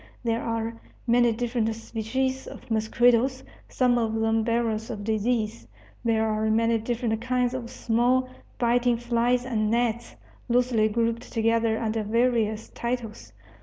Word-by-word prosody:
There 230 -1 0
are 230 0 -2 0.3
many 240 0 +4
different 230 -1 -1
species 255 +4 -3
of - - -11
mosquitoes, 240 +4 +2 0.3
some 245 -2 +2
of 225 -1 -1
them 225 0 +1
bearers 225 -1 -1
of 210 -3 -5
disease. 220 +1 -1 0.4
There 220 -1 +2
are 215 0 0
many 230 +1 +2
different 230 -1 -2
kinds 250 0 0
of 245 -2 -5
small, 245 +3 +1 0.3
biting 240 0 +2
flies 240 +1 +1
and 215 -4 0
gnats, 235 0 -1 0.3
loosely 240 -3 +3
grouped 230 +2 -1
together 230 -1 +1
under 225 0 -1
various 220 -1 0
titles. 235 -2 -5
230 Hz, 130 wpm, -26 LUFS, 220-245 Hz, 0.4 s, many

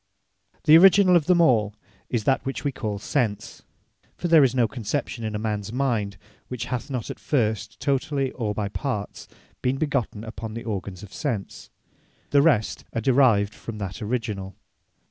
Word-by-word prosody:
The 155 0 +7
Originall 190 0 +7
of 165 -3 +3
them 180 -1 +4
all, 110 -9 +3 0.3
is 120 -4 -1
that 135 +5 +2
which 135 - -4
we 145 - 0
call 110 -5 -4
Sense; 110 -1 -2 0.6
(For 175 - -2
there 165 -3 +7
is 130 -1 +2
no 120 -3 +3
conception 120 +1 -4
in 110 -1 -3
a - - 0
mans 105 -1 -3
mind, 115 -7 -1 0.3
which 125 -2 -4
hath 125 +3 -3
not 125 -5 -3
at - - -9
first, 110 -7 -1
totally, 140 -1 0
or 105 -4 -3
by 105 -1 -1
parts, 105 -1 -4 0.3
been 130 +1 0
begotten 125 -7 -2
upon 110 -1 -7
the 115 - -5
organs 100 -3 -5
of 100 - -12
Sense.) 120 -10 -4 0.6
The 140 - +5
rest 140 -9 +2
are 115 - -1
derived 115 -5 +3
from 115 0 -8
that 95 -3 -6
originall. 105 -4 -3
115 Hz, 170 wpm, -24 LUFS, 105-140 Hz, 0.6 s, The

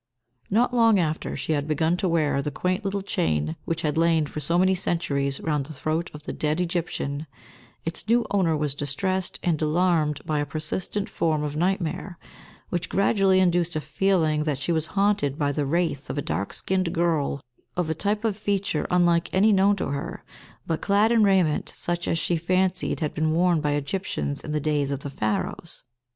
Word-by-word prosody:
Not 240 +4 +2
long 230 -3 +5
after 160 -3 -1
she - - -2
had 145 0 -1
begun 160 +2 +1
to 185 0 0
wear 155 -4 +1
the 150 - -2
quaint 180 +7 -1
little 200 0 -2
chain 80 - 0
which 165 +1 -2
had 155 0 0
lain 165 -2 +3
for 150 - -6
so 165 +4 +1
many 185 +1 +4
centuries 145 -7 -1
round 150 -4 -1
the 155 - -8
throat 155 +4 -2
of 150 0 -11
the - - -5
dead 150 +2 -1
Egyptian, 165 -4 -2 0.6
its 165 +4 -4
new 235 0 +4
owner 180 -6 +2
was 150 -2 0
distressed 180 +7 -2
and 165 -3 +1
alarmed 155 -2 +2
by 155 -1 0
a 145 - 0
persistent 155 +7 -3
form 155 -2 0
of 150 0 -3
nightmare, 175 +1 -1 0.5
which 175 -2 -2
gradually 195 -1 +3
induced 175 -2 +2
a - - +1
feeling 155 0 +1
that 150 -3 -1
she 140 +5 -2
was 160 -1 0
haunted 195 -9 +2
by 145 -3 +1
the 145 0 -1
wraith 160 -3 -1
of 130 - -4
a - - +1
dark 90 +6 -2
skinned 185 -2 -1
girl, 165 -4 0 0.4
of 180 -2 +1
a 160 - 0
type 210 +6 -1
of 215 -3 +1
feature 200 -5 -1
unlike 175 -1 +3
any 205 +3 +4
known 200 +1 +4
to 190 - -3
her, 140 0 -4 0.4
but 160 - -2
clad 205 +3 +3
in 230 -1 +4
raiment 190 -7 +2
such 175 0 -2
as 165 - +1
she 170 +1 +1
fancied 185 +2 0
had 150 - -1
been 155 0 0
worn 175 -1 +3
by 150 -1 0
Egyptians 145 - -2
in 150 - -5
the 150 - 0
days 150 -2 0
of 140 -1 -3
the 140 - -6
Pharaohs. 110 +8 -3
165 Hz, 195 wpm, -25 LUFS, 150-185 Hz, 0.6 s, long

